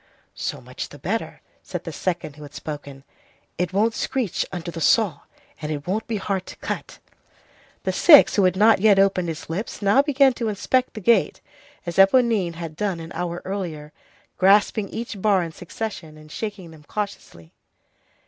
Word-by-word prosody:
"So - - -4
much - - -7
the - - -12
better," - - -4 0.2
said - - -6
the - - -6
second 170 -5 -3
who 150 - -14
had 145 -1 -11
spoken. 145 -3 -7 0.6
"It 180 -1 0
won't 215 +4 +2
screech 240 -4 -2
under 175 -2 -5
the 165 - -7
saw, 190 -3 +3 0.4
and 150 0 -4
it 145 -2 -4
won't 210 +5 -2
be 225 - -2
hard 195 -1 -3
to - - -9
cut." - - -6 0.9
The - - 0
sixth, 300 -5 +7
who 200 - +4
had 185 - +2
not 215 +2 +5
yet 210 -2 +5
opened 195 -2 +3
his 160 -2 -6
lips, 185 +7 -4
now 205 +6 +4
began 280 -2 +3
to 230 -2 -2
inspect 250 +5 0
the 215 - -6
gate, 230 +4 +3 0.5
as 170 -1 -5
Éponine 195 -3 +4
had 165 -2 -7
done 190 -1 -2
an 165 0 -9
hour 175 -1 -4
earlier, 165 -6 -5 0.5
grasping 200 +1 +4
each 225 -3 -6
bar 200 -3 +3
in 165 - -5
succession, 175 -3 -7
and 155 0 -15
shaking 200 -5 -6
them 155 -2 -15
cautiously. 175 - -6
190 Hz, 175 wpm, -23 LUFS, 165-215 Hz, 0.9 s, sixth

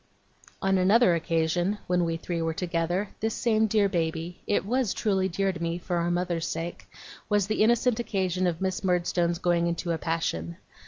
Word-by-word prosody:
On 195 0 +3
another 195 +1 +5
occasion, 170 +4 0
when 180 -1 +1
we 165 0 -1
three 170 0 -3
were 165 0 -1
together, 175 +3 -1
this 220 0 -1
same 220 -2 +2
dear 210 -1 +3
baby 165 -1 -2
it 205 - +1
was 245 -1 0
truly 190 -3 +1
dear 195 +2 0
to 175 - -8
me, 170 0 -1
for 175 0 -3
our 170 0 0
mother's 175 -1 -1
sake 165 +1 -5 0.4
was 205 -2 +3
the 215 +2 -1
innocent 240 +1 +3
occasion 185 -5 0
of 170 0 -2
Miss 190 0 -1
Murdstone's 175 -1 +1
going 170 -1 +1
into 170 0 -2
a 165 - -1
passion. 85 - -2
180 Hz, 180 wpm, -27 LUFS, 170-195 Hz, 0.4 s, another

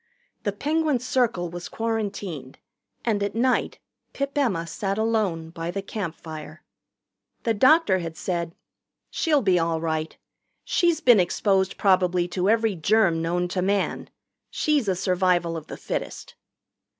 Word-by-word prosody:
The - - +1
Penguin 305 -2 0
Circle 235 -8 0
was 175 0 -7
quarantined, 200 - -4 0.5
and 215 -3 +1
at 200 +1 -2
night 255 +2 +1 0.4
Pip 275 0 -3
Emma 220 -13 +1
sat 195 +4 -3
alone 210 -8 0
by 165 0 -5
the 195 +2 -3
campfire. 160 -6 -7 0.8
The 230 - +2
doctor 255 - +4
had 165 -2 -6
said: 170 -2 -3 0.6
"She'll 300 -5 +2
be 185 -3 +3
all 165 -1 0
right. 160 -1 -2 0.5
She's 340 -2 +1
been 245 -8 +6
exposed 190 +1 +1
probably 180 -2 +3
to 185 +2 0
every 225 -1 +3
germ 175 -1 +2
known 175 +2 0
to 180 0 -1
man. 200 +2 -1 0.4
She's 295 -7 +1
a 190 - +2
survival 180 -2 +1
of 160 -2 -7
the - - -7
fittest." - - -5
190 Hz, 140 wpm, -25 LUFS, 170-225 Hz, 0.8 s, been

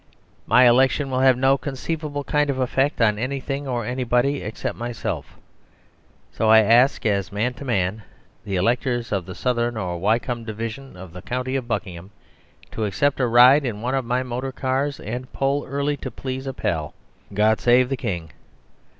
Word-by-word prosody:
My 125 0 +6
election 130 +3 +3
will 130 - 0
have 130 -1 +5
no 135 +1 +3
conceivable 145 +1 -4
kind 150 +1 +1
of 135 - -1
effect 135 +3 0
on 105 -2 +2
anything 135 +2 -3
or 120 -3 -2
anybody 125 +3 0
except 110 - -4
myself; 120 -2 -5 0.9
so 110 - 0
I 110 0 +8
ask, 120 +6 +4
as 100 -4 0
man 110 +5 -1
to 140 - -10
man, 105 -3 -1 0.4
the 100 -2 -3
Electors 120 +4 0
of 95 -4 -2
the 95 - -7
Southern 120 -2 -1
or 90 -4 -3
Wycombe 115 +4 0
Division 115 +2 -6
of 90 -2 -11
the 90 - -9
County 125 +4 -3
of 130 -3 -2
Buckingham 95 -5 -4 0.6
to 110 - -2
accept 140 +9 0
a 125 - +2
ride 125 +5 +7
in 110 -5 -4
one 125 +2 -1
of 135 -1 0
my 125 +2 -1
motor 130 +2 -4
cars; 135 +2 -2
and 125 +4 -6
poll 140 +1 0
early 140 +1 -1
to 130 - -6
please 130 +2 -6
a 135 - -3
pal 80 - -2 0.4
God 105 +2 +2
Save 125 +1 +4
the 135 - 0
King." 85 - -4
125 Hz, 175 wpm, -22 LUFS, 110-135 Hz, 0.9 s, I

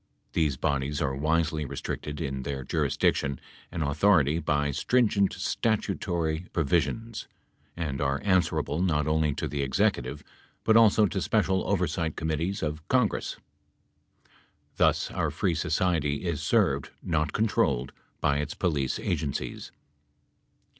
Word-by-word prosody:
These 75 -5 +1
bodies 70 -1 -1
are 65 - 0
wisely 80 +1 +1
restricted 75 +1 -5
in 70 -4 -3
their 70 0 -4
jurisdiction 70 +1 0 0.3
and 85 -2 -2
authority 75 0 +3
by 75 -2 0
stringent 105 - +2
statutory 90 -6 -1
provisions 90 +9 -1 0.5
and 75 -5 -3
are 70 0 +1
answerable 90 -5 +1
not 75 -5 +1
only 75 -2 +1
to - - -2
the 70 -1 -3
Executive 65 -1 0 0.4
but 110 - +4
also 110 -1 +6
to 100 -1 -2
special 95 -1 +1
oversight 90 -4 0
committees 80 +4 -2
of 75 0 -4
Congress. 125 -5 +1 1.4
Thus - - +2
our - - 0
free - - 0
society 80 -4 0
is 85 -5 -1
served, - - +2
not 75 -3 0
controlled, 100 - +1 0.3
by 70 0 +2
its 75 +1 -3
police 70 -8 0
agencies. 70 -3 -3
80 Hz, 120 wpm, -27 LUFS, 70-95 Hz, 1.4 s, also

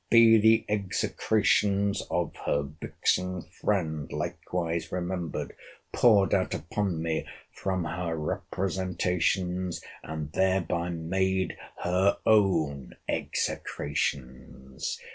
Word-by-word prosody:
Be 115 -1 +7
the 110 +1 +5
execrations 100 0 +1
of 85 -1 -1
her 70 - +2
vixen 90 +5 -1
friend 80 -6 -2
likewise 85 -1 -3
remembered, 90 -2 -3 0.4
poured 105 -5 +5
out 95 -2 +1
upon 95 -4 -2
me 80 -1 -1 0.2
from 95 -2 -2
her 85 +1 -2
representations, 90 +2 -1 0.2
and 75 -1 -5
thereby 90 -2 +1
made 95 +3 0 0.3
her 95 +3 +3
own 85 -10 +2
execrations! 65 -2 -3
90 Hz, 85 wpm, -28 LUFS, 80-95 Hz, 0.4 s, Be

